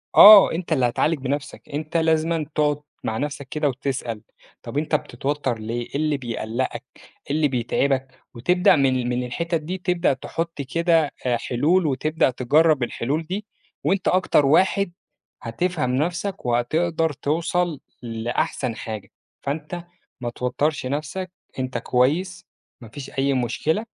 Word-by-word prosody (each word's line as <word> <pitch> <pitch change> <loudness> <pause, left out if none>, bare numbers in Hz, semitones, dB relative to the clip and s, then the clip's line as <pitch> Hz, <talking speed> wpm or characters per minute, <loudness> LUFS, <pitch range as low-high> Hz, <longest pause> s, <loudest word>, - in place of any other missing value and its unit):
آه، 205 -1 +11
أنت 165 -1 -2
اللي 130 -4 +2
هتعالج 155 +6 +1
بنَفسك، 140 +2 -4
أنت 155 +3 -2
لازمًا 160 0 +1
تقعد 150 -1 +1 0.2
مع 110 - -2
نَفسك 140 -1 -4
كده 150 -1 0
وتسأل، 125 -4 -3 0.4
طَب - - -6
أنت 150 +1 +1
بتتوتّر 145 -4 -2
ليه، 115 +2 -3
إيه - - -10
اللي 150 0 +1
بيقلّقك، 120 -1 -3
إيه - - -13
اللي 155 -1 +3
بيتعبك؟ 130 +1 -1
وتبدأ 180 +10 +4
من 130 -4 +1
من 125 0 -1
الحتّت 165 +6 -2
دي، 180 +5 -4
تبدأ 180 -3 +1
تحط 165 +3 -4
كده 165 +2 +2
آآ 120 -2 +2
حلول 155 +10 +1
وتبدأ 155 +3 +1
تجرّب 145 +3 +3
الحلول 140 +7 -2
دي 195 +6 -4 0.4
وأنت 190 -1 +1
أكتر 180 -5 +3
واحد 190 +5 +3 0.5
هتفهم 130 +1 -1
نَفسك 175 +3 -2
وهتقدر 160 +7 +1
توصل 165 +2 -1 0.2
لأحسن 115 +1 -2
حاجة. 110 -2 -6 0.3
فأنت 155 +4 -4 0.4
ما 120 - -2
توتّرش 130 +4 -1
نَفسك، 155 +7 -3 0.3
أنت 130 0 -2
كويس، 155 +10 0 0.4
ما 115 - -11
فيش 140 +3 -8
أي 140 0 +2
مشكلة. 155 - 0
145 Hz, 140 wpm, -23 LUFS, 125-165 Hz, 0.5 s, آه